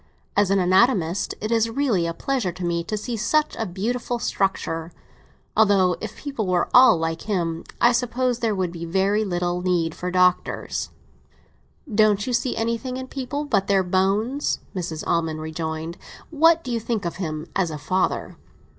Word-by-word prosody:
As 205 -1 +3
an 195 - +3
anatomist, 185 -1 +2
it 215 +2 -3
is 230 0 +2
really 225 -9 +1
a 165 - -2
pleasure 255 -7 -1
to 180 +1 -6
me 170 -1 0
to 215 - -2
see 235 +3 -4
such 300 +8 +1
a 225 - -3
beautiful 235 +7 -2
structure; 185 -7 -1 0.6
although, 195 -4 +4
if 220 -1 -6
people 275 -8 -4
were 180 -1 +1
all 250 -7 +8
like 165 +5 -3
him, 170 -5 -1
I 240 - +6
suppose 245 0 0
there 225 -3 0
would 185 -3 -1
be 170 -1 -7
very 195 +5 +1
little 175 -2 -1
need 175 -3 0
for 180 - -4
doctors." 180 0 +1 1.0
"Don't 210 -3 +3
you 250 - -2
see 240 +1 0
anything 230 +3 -2
in 260 0 -6
people 285 +2 -4
but 200 -8 +1
their 195 -1 +3
bones?" 200 +9 +1 0.2
Mrs. 165 -4 -4
Almond 160 -2 0
rejoined. 160 +1 -4 0.3
"What 330 +2 +4
do 255 - -5
you 235 - 0
think 225 -3 -2
of 170 - -3
him 155 -4 -4
as 185 -3 +1
a 155 - -5
father?" 185 +6 -1
195 Hz, 170 wpm, -23 LUFS, 175-235 Hz, 1.0 s, all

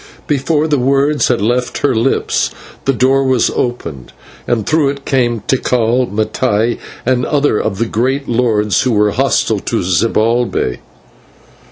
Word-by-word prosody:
Before 150 +2 0
the 145 -3 +1
words 140 +3 +2
had 120 -5 0
left 125 +3 0
her 140 - +2
lips 115 +4 0 0.4
the 135 - +3
door 135 +2 +2
was 130 -3 +2
opened, 80 - -4 0.3
and 115 -4 0
through 155 -3 +2
it 140 0 -6
came 120 -4 0
Tikal, 125 +1 +1
Mattai, 110 +2 0 0.3
and 125 0 +1
other 145 -5 +1
of 100 -3 -2
the 115 - 0
great 130 +5 -1
lords 110 -4 +1
who 130 -2 0
were 105 -1 +2
hostile - - +1
to - - -2
Zibalbay. 110 - 0
125 Hz, 145 wpm, -15 LUFS, 110-135 Hz, 0.4 s, the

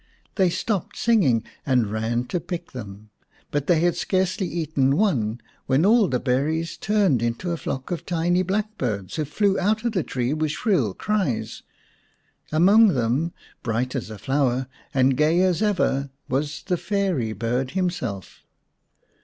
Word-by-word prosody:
They 190 -3 +3
stopped 195 +1 -2
singing 175 - +3 0.2
and 125 -6 +1
ran 115 +2 -1
to 180 - -1
pick 175 +1 -6
them, 105 -3 -9 0.4
but 145 -1 -1
they 165 -3 +4
had 175 0 +2
scarcely 185 0 0
eaten 150 -5 0
one 125 - +1 0.3
when 135 +6 +3
all 220 0 +5
the 125 -6 0
berries 150 +7 0
turned 195 - +2
into 120 +10 -2
a 170 - -1
flock 135 -2 -5
of 170 -2 -3
tiny 175 +1 +1
blackbirds, 185 - -2
who 155 - 0
flew 195 +6 +1
out 215 +4 +1
of 235 - +2
the 190 -5 0
tree 125 -2 -2
with 155 0 0
shrill 160 - +1
cries. 195 - -1 0.9
Among 195 +8 +6
them, 130 +8 0 0.3
bright 125 +3 -1
as 125 -4 -3
a 110 - -7
flower 130 0 0 0.3
and 130 -1 +3
gay 155 +5 +3
as 185 0 +2
ever, 175 -10 +1 0.2
was 140 +1 -2
the 180 - 0
fairy 185 - -1
bird 120 +4 -1
himself. 125 - -3
155 Hz, 155 wpm, -24 LUFS, 125-185 Hz, 0.9 s, Among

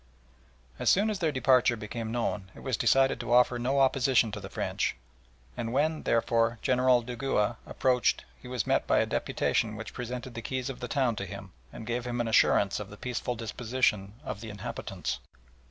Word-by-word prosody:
As - - +2
soon 210 +3 +4
as 205 - -3
their 165 -4 +1
departure 130 -3 +4
became 110 +1 -5
known 105 -5 -2
it - - -11
was 130 -3 -1
decided 135 +3 +3
to 120 0 -4
offer 125 0 +4
no 130 +3 +1
opposition 130 -3 +3
to 105 - -5
the 95 -1 -8
French, - - -1 0.6
and 115 -1 -3
when, 155 +4 +1
therefore, 115 0 +2
General 125 -1 +3
Dugua 120 -2 -1
approached 125 -3 +1 0.2
he - - -11
was 125 -3 -2
met - - +1
by - - +3
a - - +3
deputation 110 -1 0
which 110 +1 -7
presented 125 +1 -5
the 115 - -5
keys 130 +2 -3
of 130 - -10
the 125 - -4
town 125 -2 +1
to 100 - -3
him, 100 0 -8 0.2
and 110 - -9
gave 120 +2 -2
him 120 0 -3
an 120 - 0
assurance 110 - +3
of - - -7
the - - -11
peaceful 125 0 -3
disposition 110 -3 -1
of 100 - -5
the 115 - -7
inhabitants. 105 -2 -5
120 Hz, 190 wpm, -29 LUFS, 115-130 Hz, 0.6 s, soon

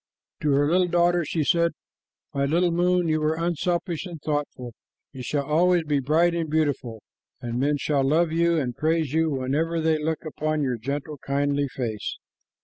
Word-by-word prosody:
Then 150 - 0
to 140 - +4
her 145 +1 +3
little 180 +3 +3
daughter 175 0 +2
she 155 +1 -1
said, 170 +2 +2 0.6
"My 140 0 +1
little 170 +5 +2
moon, 180 0 +2
you 155 -1 +1
were 155 +1 +1
unselfish 170 +1 -1
and 170 -3 -8
thoughtful. 145 -5 -3 0.4
You 130 - -8
shall 140 +3 -2
always 170 +4 +3
be 145 -2 0
bright 160 +6 +2
and 165 -2 -2
beautiful, 145 -8 -1 0.4
and 120 0 -4
men 145 +2 +1
shall 140 0 0
love 155 +4 +2
you 170 +1 +2
and 125 -5 -2
praise 155 -2 0
you 160 0 +2
whenever 150 +5 -1
they 160 -1 +2
look 160 +1 -2
upon 155 0 -1
your 125 -3 -1
gentle, 140 +4 -4
kindly 140 +1 0
face." 115 -5 -4
155 Hz, 180 wpm, -25 LUFS, 140-170 Hz, 0.6 s, to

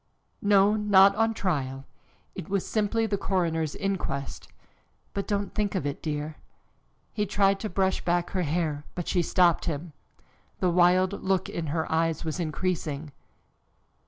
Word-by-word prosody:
"No, 205 0 +4
not 200 -2 +6
on 225 +1 +2
trial. 135 -9 -2 0.5
It - - -8
was 195 -1 0
simply 225 +1 0
the 200 -2 -1
coroner's 165 -6 -1
inquest. 185 -9 -3 0.7
But 200 - -3
don't 200 -2 -2
think 210 -2 -1
of 180 - -1
it, 145 -1 -3
dear." 150 0 -4 0.8
He 210 -1 -1
tried 195 0 +2
to 215 - -4
brush 190 +1 0
back 175 0 0
her 185 - 0
hair, 155 -2 -1
but 175 - -4
she 180 - +2
stopped 175 0 +3
him. 160 0 -4 0.7
The 180 - +2
wild 180 +2 +3
look 190 -1 0
in 165 -2 -4
her 160 +2 -1
eyes 165 0 0
was 160 +2 -3
increasing. 155 -3 -2
180 Hz, 150 wpm, -27 LUFS, 160-200 Hz, 0.8 s, not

